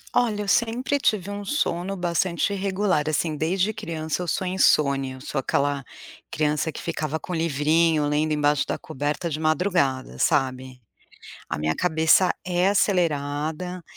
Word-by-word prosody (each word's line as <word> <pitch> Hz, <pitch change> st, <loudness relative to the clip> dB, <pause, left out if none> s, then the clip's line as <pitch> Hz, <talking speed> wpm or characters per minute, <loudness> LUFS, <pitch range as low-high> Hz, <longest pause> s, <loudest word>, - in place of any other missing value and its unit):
Olha, 220 Hz, -4 st, +2 dB
eu 205 Hz, -, -5 dB
sempre 240 Hz, +6 st, +1 dB
tive 205 Hz, -7 st, 0 dB
um 205 Hz, 0 st, -5 dB
sono 195 Hz, -, -1 dB
bastante 175 Hz, +1 st, 0 dB
irregular, 190 Hz, -5 st, 0 dB
assim, 155 Hz, 0 st, 0 dB
desde 185 Hz, +6 st, +1 dB
criança 165 Hz, -5 st, -4 dB
eu -, -, -6 dB
sou 185 Hz, +3 st, -1 dB
insone, 140 Hz, -7 st, +2 dB
eu 130 Hz, 0 st, -10 dB
sou 150 Hz, 0 st, -5 dB
aquela 140 Hz, +1 st, 0 dB, 0.5 s
criança 150 Hz, +1 st, 0 dB
que -, -, -8 dB
ficava 160 Hz, -2 st, -3 dB
com 180 Hz, -, -5 dB
livrinho 160 Hz, 0 st, +2 dB
lendo 150 Hz, +1 st, 0 dB
embaixo 150 Hz, -1 st, +2 dB
da -, -, -2 dB
coberta 155 Hz, +1 st, -3 dB
de 155 Hz, -, -3 dB
madrugada, 155 Hz, -, 0 dB
sabe, 130 Hz, -, 0 dB, 0.7 s
a -, -, -3 dB
minha 75 Hz, +1 st, 0 dB
cabeça 160 Hz, -, +3 dB
é 180 Hz, +1 st, +2 dB
acelerada 170 Hz, -2 st, 0 dB
160 Hz, 145 wpm, -24 LUFS, 145-185 Hz, 0.7 s, cabeça